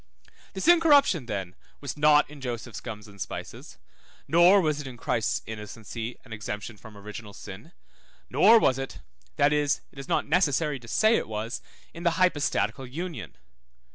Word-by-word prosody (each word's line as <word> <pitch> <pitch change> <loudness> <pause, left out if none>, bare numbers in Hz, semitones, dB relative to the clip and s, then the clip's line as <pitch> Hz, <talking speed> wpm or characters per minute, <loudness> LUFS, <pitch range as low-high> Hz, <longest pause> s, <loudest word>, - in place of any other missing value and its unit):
This - - -3
incorruption 290 - +5
then 95 -5 -4 0.3
was 140 -4 -5
not 150 0 +5
in 145 -1 -13
Joseph's 120 -2 -5
gums 105 -3 -8
and 100 -1 -13
spices, - - -7 0.5
nor 175 +6 +6
was 155 -4 0
it 140 - -8
in 125 -2 -9
Christ's 115 -1 -1
innocency, 110 +2 -7
and 115 - -9
exemption 105 +1 -6
from 105 +1 -14
original 105 +1 -9
sin, 105 - -10 0.6
nor 230 - +6
was 135 - +3
it 135 - -5 0.4
(that 145 +1 +3
is, 145 -1 +1
it 140 - -13
is 135 - -8
not - - +1
necessary 150 -3 +1
to 120 - -14
say 220 - +3
it - - -3
was) 110 +2 -4 0.3
in 170 - -9
the 170 -1 +1
hypostatical 150 -6 +1
union. 145 - -6
135 Hz, 165 wpm, -27 LUFS, 110-160 Hz, 0.6 s, nor